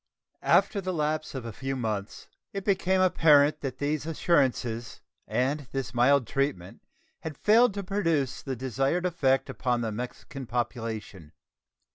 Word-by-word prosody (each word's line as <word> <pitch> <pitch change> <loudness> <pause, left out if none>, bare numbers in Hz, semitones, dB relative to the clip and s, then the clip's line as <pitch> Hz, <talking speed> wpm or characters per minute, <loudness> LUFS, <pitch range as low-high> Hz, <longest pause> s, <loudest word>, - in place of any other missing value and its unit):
After 200 - +3
the 185 -1 -3
lapse 155 -1 -1
of 130 -3 -5
a 115 - -6
few 135 +4 -4
months 110 -5 -4 0.3
it 195 -1 -4
became 190 -2 +2
apparent 150 -5 +5
that 130 -2 -4
these 145 +2 -2
assurances 125 -8 0 0.3
and 135 +2 -1
this 135 -3 -3
mild 125 +2 +4
treatment 125 -9 -2 0.4
had 155 -3 -7
failed 225 0 +4
to 200 - -3
produce 165 -9 0
the 135 -2 -4
desired 135 - -1
effect 135 -7 +1
upon 125 -1 -1
the 115 -2 -2
Mexican 125 +3 -7
population. 115 - -4
135 Hz, 140 wpm, -28 LUFS, 120-165 Hz, 0.4 s, apparent